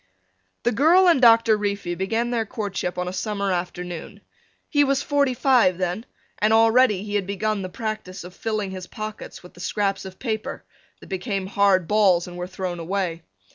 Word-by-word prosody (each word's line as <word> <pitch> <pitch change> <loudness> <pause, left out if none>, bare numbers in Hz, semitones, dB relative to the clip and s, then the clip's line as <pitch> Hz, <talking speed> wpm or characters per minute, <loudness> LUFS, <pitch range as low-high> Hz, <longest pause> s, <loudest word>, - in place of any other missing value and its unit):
The 240 - +2
girl 330 - +5
and 330 -7 +4
Doctor 230 -2 +6
Reefy 200 -4 -2
began 225 +7 -1
their 235 -2 +1
courtship 205 -5 -4
on 180 0 -2
a 180 - -4
summer 200 0 -2
afternoon. 175 -1 -5 0.5
He 290 -2 +3
was 275 0 +1
forty 280 -3 +1
five 240 -9 +3
then 185 +6 -3 0.3
and 215 +1 +2
already 225 -2 +4
he 205 -1 -6
had 200 -2 0
begun 205 +1 -1
the 185 - -5
practice 215 -3 -5
of 180 +1 -11
filling 215 -3 -2
his 185 -1 -7
pockets 215 -4 -8
with 180 - -14
the - - -16
scraps 195 +1 -1
of 190 -1 -10
paper 220 -4 -4 0.4
that - - -13
became 195 0 -3
hard 195 -3 +2
balls 195 -5 +3
and 175 - -9
were 180 0 -5
thrown 185 -1 -5
away. 170 -1 -2
200 Hz, 180 wpm, -23 LUFS, 185-225 Hz, 0.5 s, Doctor